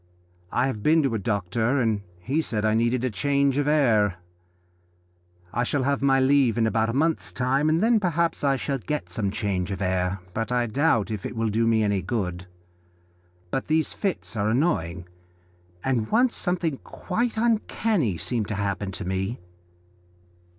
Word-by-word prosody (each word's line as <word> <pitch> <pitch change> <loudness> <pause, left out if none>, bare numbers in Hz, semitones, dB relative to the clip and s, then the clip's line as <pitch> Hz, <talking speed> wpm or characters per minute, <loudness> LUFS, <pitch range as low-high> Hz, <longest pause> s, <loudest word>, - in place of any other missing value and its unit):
I 125 - +2
have 130 -6 -3
been 160 +5 +4
to 135 -4 0
a 110 - 0
doctor, 110 +5 0
and 110 -4 +1 0.2
he 140 - 0
said 110 -8 -2
I 110 - +3
needed 120 +2 +1
change 140 +5 +1
of 145 - 0
air. 115 -10 +3 1.4
I 120 - 0
shall 135 +2 0
have 140 +1 0
my 135 -1 +4
leave 130 -3 +3
in 115 - +3
about 110 0 +1
a - - -2
month's 160 +4 0
time, 135 +4 +1
and 160 +2 +2
then 230 0 +4
perhaps 170 -4 0
I 140 -1 +3
shall 135 0 -2
get 150 +6 -4
some 105 -3 -1
change 95 -3 -2
of 95 -2 -4
air, 90 0 0 0.2
but 115 +3 -3
I 120 -1 +2
doubt 115 -3 +1
if 105 -3 -4
it - - -5
will 115 -1 0
do 115 +2 +1
me 110 -1 +3
any 100 -2 +1
good. 90 -3 -3 1.0
But 135 - -2
these 155 +1 +1
fits 195 - -3
are 105 0 0
annoying, 95 - 0 0.8
and 125 -5 0
once 240 +2 +3
something 175 -6 -1
quite 225 +4 -3
uncanny 220 - +1
seemed 115 +2 -2
to 110 - -3
happen 100 -1 -2
to 100 - -5
me." 95 +5 -2
120 Hz, 170 wpm, -25 LUFS, 105-145 Hz, 1.4 s, been